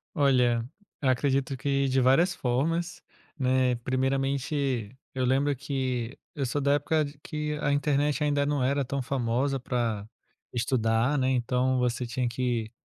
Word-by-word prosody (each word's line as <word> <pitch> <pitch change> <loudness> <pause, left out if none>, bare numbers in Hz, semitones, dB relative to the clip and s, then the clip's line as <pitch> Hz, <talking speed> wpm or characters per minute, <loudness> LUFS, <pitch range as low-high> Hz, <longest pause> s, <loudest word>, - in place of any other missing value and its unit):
Olha, 125 -5 +3 0.4
eu 135 - +2
acredito 135 +1 +1
que 140 +2 0
de 130 +1 +2
várias 150 +8 +4
formas, 165 +8 -1 0.4
né, 130 -1 +2
primeiramente, 135 -1 -1 0.2
eu 130 -1 0
lembro 135 +3 +2
que 130 -3 -3 0.2
eu 140 -2 -1
sou 145 +4 -1
da 140 +1 +3
época, 150 +2 +1
de 145 0 -7
que 150 +1 -4
a 145 - +2
internet 145 +1 +1
ainda 145 -1 +2
não 145 -2 0
era 140 +1 +1
tão 135 +2 -2
famosa, 130 +1 0
para 115 -5 -2 0.5
estudar, 115 +2 +1
né, 130 -1 +2
então 125 +1 +1
você 125 0 0
tinha 120 +1 -1
que 120 -2 -2
130 Hz, 150 wpm, -27 LUFS, 125-140 Hz, 0.5 s, várias